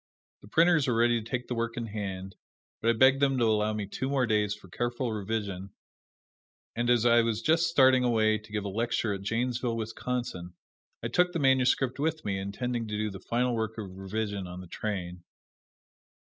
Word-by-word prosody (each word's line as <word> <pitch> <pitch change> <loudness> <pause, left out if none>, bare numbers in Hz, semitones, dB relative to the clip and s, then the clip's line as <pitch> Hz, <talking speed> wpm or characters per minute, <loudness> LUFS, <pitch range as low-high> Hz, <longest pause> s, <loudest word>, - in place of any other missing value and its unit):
The - - -15
printers 165 +3 +4
were 120 - +1
ready 120 0 +3
to 110 - -11
take 125 -2 -3
the - - -2
work 115 0 -2
in 120 - -2
hand, 95 -3 -5 0.5
but 115 - +2
I - - +5
begged 130 +4 +5
them 135 -1 +3
to 120 - +3
allow 110 -1 +2
me 105 -1 -3
two 130 +7 -4
more 135 -2 +2
days 105 -3 +1
for 105 - -16
careful 120 +6 -2
revision; 100 -2 -4 1.0
and 120 +1 0
as 120 -1 +3
I 120 0 +6
was 115 -1 -1
just 165 +3 +3
starting 130 -5 +5
away 110 -3 +2
to 105 0 -17
give 105 -1 -2
a - - -2
lecture 115 +1 -1
at 100 - -5
Janesville, 120 +3 -1
Wisconsin, 110 -5 -4 0.5
I - - 0
took 180 0 +2
the - - 0
manuscript 130 -2 +2
with 160 +2 -1
me, 100 -2 -1
intending 115 +4 -3
to 105 0 -3
do 105 0 -1
the 95 - -8
final 120 +5 0
work 110 -1 -2
of 95 -4 -7
revision 100 0 -3
on 90 +1 -8
the 90 - -9
train. 90 -3 -4
115 Hz, 200 wpm, -29 LUFS, 105-125 Hz, 1.0 s, I